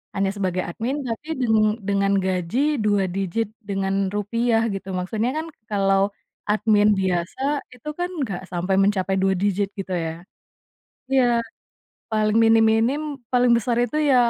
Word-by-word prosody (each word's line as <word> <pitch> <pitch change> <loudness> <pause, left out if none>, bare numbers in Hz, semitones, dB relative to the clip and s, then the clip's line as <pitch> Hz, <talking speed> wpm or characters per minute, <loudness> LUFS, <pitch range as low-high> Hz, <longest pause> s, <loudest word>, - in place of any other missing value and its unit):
hanya 195 0 +1
sebagai 185 -2 -1
admin 235 +10 -3
tapi 235 +7 -5
deng 220 -3 +3 0.3
dengan 200 0 +2
gaji 185 +3 -1 0.3
2 205 -2 +2
digit 195 +4 -1 0.2
dengan 195 0 -1 0.2
rupiah 225 +2 +1
gitu 195 0 -6
maksudnya 215 +6 -1
kan 320 - -2 0.2
kalau 195 -1 +2 0.5
admin 210 -1 +3
biasa 180 +6 -1 0.3
itu 250 +4 -15
kan 355 0 -1
enggak 200 -10 -3
sampai 180 +2 -1
mencapai 195 -1 +1
2 190 0 +3
digit 200 0 +1
gitu 190 -1 -4
ya, 165 -2 -1 1.0
iya, 260 -2 +5 0.9
paling 215 0 +2
minim-minim 225 +5 +4 0.3
paling 245 -1 +4
besar 235 +1 0
itu 245 +5 -2
ya 255 - +5
205 Hz, 140 wpm, -23 LUFS, 190-230 Hz, 1.0 s, iya